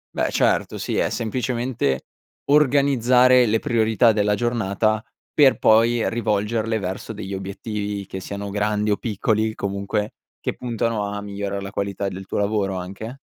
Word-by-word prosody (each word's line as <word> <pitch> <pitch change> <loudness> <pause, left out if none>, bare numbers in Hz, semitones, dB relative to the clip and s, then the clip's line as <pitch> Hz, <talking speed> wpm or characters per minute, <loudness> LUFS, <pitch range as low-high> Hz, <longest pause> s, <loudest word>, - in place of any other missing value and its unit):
Beh, - - 0
certo. - - +1
Sì, - - -3
è - - +2
semplicemente 120 - -1 0.4
organizzare 130 -3 +4
le 110 0 +2
priorità 110 0 +3
della 105 -1 +2
giornata, 110 -2 0 0.3
per 140 -3 +5
poi 115 +1 +4
rivolgerle 110 0 0
verso 95 +3 -5
degli 100 -2 -6
obiettivi, 100 +1 -4
che 95 - -6
siano 100 +1 -5
grandi 105 +1 0
o 100 - +2
piccoli, 110 0 0
comunque 100 +1 -3 0.3
che - - -3
puntano 115 -3 -2
a 100 0 -4
migliorare 100 -1 -4
la 95 0 -6
qualità 100 -1 -2
del 95 0 -6
tuo - - -4
lavoro, 100 -2 0
anche? 100 +8 -7
105 Hz, 145 wpm, -22 LUFS, 100-115 Hz, 0.4 s, per